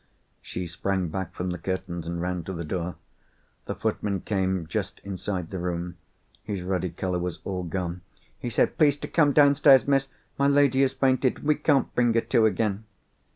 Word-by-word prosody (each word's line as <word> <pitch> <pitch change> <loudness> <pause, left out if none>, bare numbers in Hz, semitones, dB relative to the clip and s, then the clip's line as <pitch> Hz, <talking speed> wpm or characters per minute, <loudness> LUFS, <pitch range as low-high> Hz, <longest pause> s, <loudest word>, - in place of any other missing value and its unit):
She 90 - -5
sprang 90 +2 -2
back 95 +1 -4
from 90 0 -3
the 90 - -5
curtains, 90 -3 -4
and 85 0 -3
ran 90 0 -2
to 95 - -4
the 85 -1 -4
door. 85 +2 -3 0.7
The - - -4
footman 100 -3 -2
came 95 -4 -1
just 100 +4 -3
inside 95 -3 -4
the 95 - -4
room. 85 -1 -3 0.5
His 100 -4 -4
ruddy 90 -1 -1
colour 90 +1 -2
was 90 -1 -3
all 95 -2 -3
gone. 90 0 -4 0.4
He 120 - -3
said, 115 - +1
"Please 145 -3 +5
to - - -6
come 150 -4 +3
downstairs, 140 -2 +6
Miss! 135 -1 +2 0.3
My 140 - +4
lady 140 -2 +4
has 135 -1 +3
fainted, 130 -1 +2
and - - -13
we 150 - +5
can't 145 -3 +1
bring 120 -2 +2
her 115 - +4
to 110 -1 +3
again." 105 0 -1
95 Hz, 190 wpm, -26 LUFS, 90-130 Hz, 0.7 s, downstairs